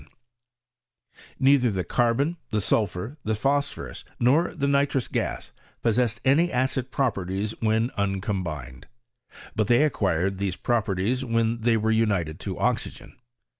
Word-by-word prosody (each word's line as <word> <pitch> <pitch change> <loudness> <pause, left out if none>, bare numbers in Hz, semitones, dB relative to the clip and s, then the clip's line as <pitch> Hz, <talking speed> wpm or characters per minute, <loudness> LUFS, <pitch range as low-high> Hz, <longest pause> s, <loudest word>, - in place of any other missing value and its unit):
Neither 135 -2 +4
the 95 -3 -1
carbon, 125 - +1
the 110 - 0
sulphur, 105 +6 -1
the 110 0 0
phosphorus, 140 +5 -1 0.2
nor 145 +9 +3
the 140 - 0
nitrous 140 -2 +1
gas, - - -3 0.3
possessed 115 -1 +1
any 160 +7 +4
acid 130 0 0
properties 100 -5 -1
when 110 +2 +1
uncombined; 95 -10 -3 0.7
but 110 -2 +1
they 120 +5 +5
acquired 95 - 0
these 95 -2 -2
properties 115 +2 0
when 115 -1 0
they 115 0 +3
were 110 +1 +1
united 100 -8 +1
to - - -5
oxygen. - - -2
115 Hz, 125 wpm, -25 LUFS, 100-130 Hz, 0.7 s, they